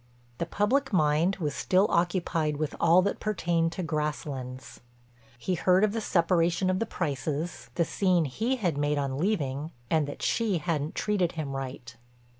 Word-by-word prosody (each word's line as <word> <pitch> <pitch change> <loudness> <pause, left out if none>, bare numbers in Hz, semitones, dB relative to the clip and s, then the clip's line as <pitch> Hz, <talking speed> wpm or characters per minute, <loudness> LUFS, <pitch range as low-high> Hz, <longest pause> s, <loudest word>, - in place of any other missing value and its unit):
The 170 - -1
public 260 +10 +1
mind 160 +1 +3
was 150 -6 -2
still 190 +2 +2
occupied 170 -3 +1
with 155 -1 -2
all 180 +3 +5
that 200 - -1
pertained 170 -5 0
to 185 - -4
Grasslands. 135 -6 -4 0.6
He 185 +10 -2
heard 180 +2 +3
of 215 - +3
the 225 - -2
separation 175 -1 +2
of 185 - 0
the 230 - -1
Prices, 155 0 -3
the 170 - +2
scene 180 -3 +2
he 220 - -1
had 175 - -1
made 145 0 +1
on 140 -1 -2
leaving, 155 -6 -1 0.2
and 155 -3 +2
that 145 - -7
she 220 -6 +1
hadn't 155 -2 -2
treated 195 -5 0
him 150 -4 -4
right. 130 -3 -6
165 Hz, 165 wpm, -28 LUFS, 150-185 Hz, 0.6 s, all